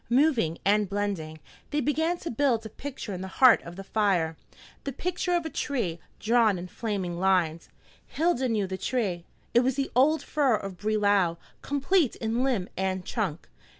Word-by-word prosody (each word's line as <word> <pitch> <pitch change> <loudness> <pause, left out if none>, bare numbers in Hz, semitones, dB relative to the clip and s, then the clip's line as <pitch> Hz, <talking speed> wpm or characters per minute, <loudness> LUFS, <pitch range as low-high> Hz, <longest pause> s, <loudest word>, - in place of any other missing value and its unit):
Moving 240 - +3
and 205 0 +3
blending, 195 -6 -3 0.3
they 295 - 0
began 320 +5 +1
to 335 - -4
build 235 -2 +1
a - - -5
picture 260 -4 -7
in 180 - -5
the 190 - -5
heart 255 -3 +7
of 170 +1 -10
the 195 - -7
fire, 190 -6 +1 0.5
the 275 - -3
picture 355 +4 -1
of 340 -2 0
a - - -2
tree, 210 - -2 0.2
drawn 225 -3 +3
in 175 +1 -6
flaming 190 -6 -3
lines. 175 -4 +1 0.4
Hilda 285 -5 +1
knew 215 -3 +1
the 190 0 -5
tree. 195 -6 -1 0.3
It 235 - +6
was 255 +1 +1
the 275 -1 -2
old 300 +5 +4
fir 280 -6 +2
of 195 -3 -6
Brelau, 205 -5 +2 0.2
complete 285 +1 +1
in 230 +2 -1
limb 240 -9 0
and 190 -1 -2
trunk. 185 -8 -3
215 Hz, 175 wpm, -27 LUFS, 190-270 Hz, 0.5 s, heart